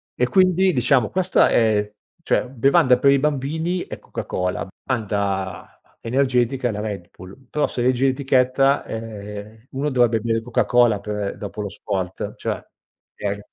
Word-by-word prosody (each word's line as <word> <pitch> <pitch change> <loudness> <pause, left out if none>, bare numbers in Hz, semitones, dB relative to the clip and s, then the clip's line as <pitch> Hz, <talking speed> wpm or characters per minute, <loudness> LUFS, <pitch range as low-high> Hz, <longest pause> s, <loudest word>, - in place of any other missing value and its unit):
e 125 - +1
quindi 185 +4 +4
diciamo 125 -4 +2
questa 185 0 +3
è 105 -2 +2 0.3
cioè 130 - 0
bevanda 130 +1 +3
per 140 - +4
i 140 - +5
bambini 150 +5 -1
è - - -7
Coca-Cola, 90 +1 -4 0.2
bevanda 100 -6 -2 0.2
energetica 125 0 +1
è - - -1
la 105 0 -4
Red 100 -5 -5
Bull, 100 +8 -14
però 150 - +1
se 125 - -3
leggi 125 +1 +2
l'etichetta, 135 0 +2
ehm, 110 0 -8
uno 140 +3 -1
dovrebbe 120 -4 +3
bere 115 +1 -1
Coca-Cola 120 -2 +2
per 105 -1 -4
dopo 105 +1 -6
lo 100 - -4
sport 95 -2 -4
cioè, - - -4 0.5
okay? 100 0 -3
120 Hz, 145 wpm, -22 LUFS, 105-135 Hz, 0.5 s, i